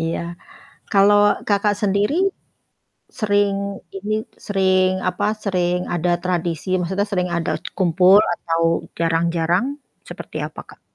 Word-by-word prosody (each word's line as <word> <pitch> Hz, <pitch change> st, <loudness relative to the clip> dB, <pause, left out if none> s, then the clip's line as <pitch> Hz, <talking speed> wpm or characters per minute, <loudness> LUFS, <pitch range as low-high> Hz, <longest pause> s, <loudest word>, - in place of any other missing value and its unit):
Iya. 165 Hz, 0 st, -2 dB, 0.7 s
Kalau 205 Hz, +1 st, +5 dB, 0.3 s
Kakak 205 Hz, 0 st, +2 dB
sendiri 205 Hz, +6 st, +1 dB, 1.1 s
sering 205 Hz, -2 st, +2 dB, 0.4 s
ini 205 Hz, +2 st, -3 dB, 0.3 s
sering 190 Hz, -2 st, +3 dB
apa 185 Hz, +2 st, -1 dB, 0.2 s
sering 180 Hz, -2 st, 0 dB
ada 175 Hz, +1 st, 0 dB
tradisi 175 Hz, -1 st, -2 dB
maksudnya 190 Hz, +3 st, -1 dB
sering 180 Hz, -2 st, 0 dB
ada 170 Hz, 0 st, -1 dB, 0.3 s
kumpul 185 Hz, +2 st, +5 dB
atau 165 Hz, -1 st, -2 dB, 0.4 s
jarang-jarang 170 Hz, +4 st, +1 dB, 0.4 s
seperti -, -, -8 dB
apa -, -, -10 dB
Kak? -, -, -16 dB
185 Hz, 110 wpm, -21 LUFS, 170-200 Hz, 1.1 s, Kalau